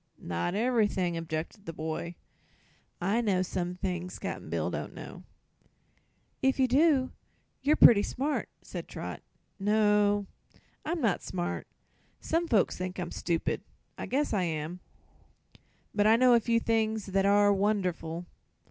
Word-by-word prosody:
"Not 85 Hz, -, -3 dB
ever'thing," 210 Hz, -6 st, +1 dB
objected 165 Hz, +4 st, -5 dB
the 165 Hz, -, -4 dB
boy. 160 Hz, +2 st, -4 dB, 0.8 s
"I 200 Hz, +7 st, +1 dB
know 195 Hz, -5 st, +1 dB
some 180 Hz, 0 st, -3 dB
things 180 Hz, -1 st, -4 dB
Cap'n -, -, -5 dB
Bill -, -, -1 dB
don't -, -, -5 dB
know." -, -, -9 dB, 1.2 s
"If 265 Hz, +1 st, +2 dB
you 260 Hz, -, +4 dB
do 270 Hz, 0 st, +3 dB, 0.5 s
you're 290 Hz, +3 st, +3 dB
pretty 215 Hz, -8 st, +8 dB
smart," 285 Hz, +7 st, -2 dB
said -, -, -7 dB
Trot. -, -, -6 dB, 0.4 s
"No; 205 Hz, 0 st, +3 dB, 0.6 s
I'm 330 Hz, +1 st, -2 dB
not 220 Hz, -7 st, +1 dB
smart. 175 Hz, -1 st, -4 dB, 0.5 s
Some 335 Hz, +1 st, 0 dB
folks 215 Hz, -, +2 dB
think 185 Hz, 0 st, -4 dB
I'm 180 Hz, -, -4 dB
stupid. 170 Hz, -2 st, -1 dB, 0.3 s
I -, -, -6 dB
guess 285 Hz, +1 st, 0 dB
I 200 Hz, -, +2 dB
am. 165 Hz, 0 st, -3 dB, 1.1 s
But 205 Hz, 0 st, +3 dB
I 220 Hz, -, +7 dB
know 250 Hz, +1 st, +5 dB
a 235 Hz, -, +6 dB
few 230 Hz, +1 st, +1 dB
things 220 Hz, -2 st, 0 dB
that 195 Hz, 0 st, +1 dB
are 205 Hz, 0 st, +5 dB
wonderful. 180 Hz, -4 st, -1 dB
205 Hz, 140 wpm, -29 LUFS, 180-230 Hz, 1.2 s, pretty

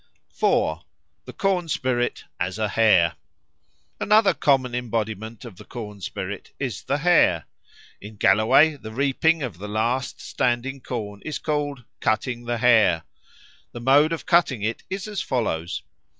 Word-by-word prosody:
4. -, -, +1 dB, 0.4 s
The -, -, -9 dB
Corn 185 Hz, -3 st, 0 dB
spirit 130 Hz, -4 st, -1 dB, 0.2 s
as 90 Hz, +3 st, -2 dB
a 110 Hz, -1 st, -1 dB
Hare 100 Hz, -7 st, +3 dB, 0.8 s
ANOTHER 210 Hz, 0 st, +4 dB
common 130 Hz, -3 st, +2 dB
embodiment 110 Hz, -2 st, -3 dB
of 110 Hz, -7 st, -11 dB
the -, -, -11 dB
corn 105 Hz, -5 st, -8 dB
spirit -, -, -6 dB
is 125 Hz, -7 st, -4 dB
the 140 Hz, +2 st, -1 dB
hare. 150 Hz, -, +3 dB, 0.6 s
In 105 Hz, +2 st, -10 dB
Galloway 110 Hz, +9 st, +4 dB
the 110 Hz, -5 st, -9 dB
reaping 140 Hz, +5 st, +1 dB
of 105 Hz, -10 st, -5 dB
the 105 Hz, -, -6 dB
last 120 Hz, +5 st, -1 dB
standing 125 Hz, +3 st, -1 dB
corn 105 Hz, -5 st, -5 dB
is 155 Hz, -, -3 dB
called 145 Hz, -4 st, -2 dB, 0.2 s
"cutting 120 Hz, +2 st, -1 dB
the 120 Hz, 0 st, -1 dB
Hare." 110 Hz, -9 st, +4 dB, 0.7 s
The 120 Hz, -, -7 dB
mode 145 Hz, +5 st, +5 dB
of 165 Hz, -, -4 dB
cutting 160 Hz, -, +2 dB
it 110 Hz, +2 st, -2 dB
is 190 Hz, +2 st, -4 dB
as 205 Hz, -3 st, -3 dB
follows. 90 Hz, -, -2 dB
120 Hz, 145 wpm, -24 LUFS, 110-145 Hz, 0.8 s, mode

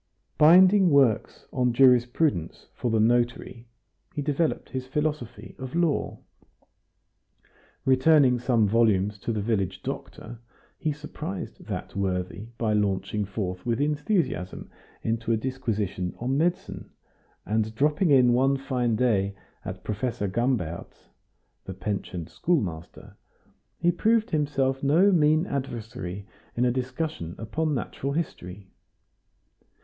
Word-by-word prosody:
Binding 185 Hz, +4 st, +7 dB
works 135 Hz, -7 st, +2 dB
on 125 Hz, -1 st, +1 dB
jurisprudence 125 Hz, -, +2 dB
for 120 Hz, -, -2 dB
the 110 Hz, -1 st, +2 dB
notary, 120 Hz, +1 st, 0 dB, 0.5 s
he 145 Hz, -, -2 dB
developed 150 Hz, +2 st, -1 dB
his 130 Hz, -1 st, -4 dB
philosophy 150 Hz, -4 st, -3 dB
of 130 Hz, +3 st, -6 dB
law; 170 Hz, -4 st, 0 dB, 1.7 s
returning 130 Hz, -1 st, +4 dB
some 115 Hz, -3 st, +2 dB
volumes 105 Hz, -2 st, +2 dB
to 115 Hz, -, -3 dB
the 105 Hz, -3 st, -2 dB
village 95 Hz, -4 st, -1 dB
doctor, 120 Hz, -, -7 dB, 0.4 s
he 155 Hz, -, 0 dB
surprised 145 Hz, -10 st, -7 dB
that -, -, -5 dB
worthy 95 Hz, +1 st, -2 dB
by 110 Hz, -2 st, 0 dB
launching 105 Hz, 0 st, 0 dB
forth 95 Hz, -3 st, -4 dB
with 120 Hz, -1 st, -1 dB
enthusiasm 145 Hz, -, -1 dB, 0.3 s
into 115 Hz, 0 st, -1 dB
a 115 Hz, -, +3 dB
disquisition 110 Hz, -7 st, -3 dB
on 130 Hz, +3 st, -1 dB
medicine; 170 Hz, +5 st, -1 dB, 0.6 s
and 110 Hz, +1 st, -1 dB
dropping 150 Hz, -, +2 dB
in 125 Hz, -4 st, +5 dB
one 135 Hz, +2 st, +3 dB
fine 125 Hz, -4 st, -1 dB
day 100 Hz, -5 st, +1 dB, 0.3 s
at -, -, -7 dB
Professor 110 Hz, 0 st, -2 dB
Gambert's, 105 Hz, -6 st, -2 dB, 0.6 s
the 95 Hz, -, -7 dB
pensioned 95 Hz, -4 st, -4 dB
schoolmaster, 95 Hz, -, -3 dB, 0.6 s
he 175 Hz, +1 st, +2 dB
proved 220 Hz, +5 st, +1 dB
himself 135 Hz, -3 st, 0 dB
no 165 Hz, +9 st, +4 dB
mean 155 Hz, -1 st, +3 dB
adversary 115 Hz, -, -5 dB, 0.3 s
in 120 Hz, -, +2 dB
a 125 Hz, -, +3 dB
discussion 130 Hz, -, -4 dB
upon 150 Hz, +7 st, -2 dB
natural 135 Hz, +2 st, -3 dB
history. 95 Hz, -, -5 dB
125 Hz, 115 wpm, -26 LUFS, 105-145 Hz, 1.7 s, Binding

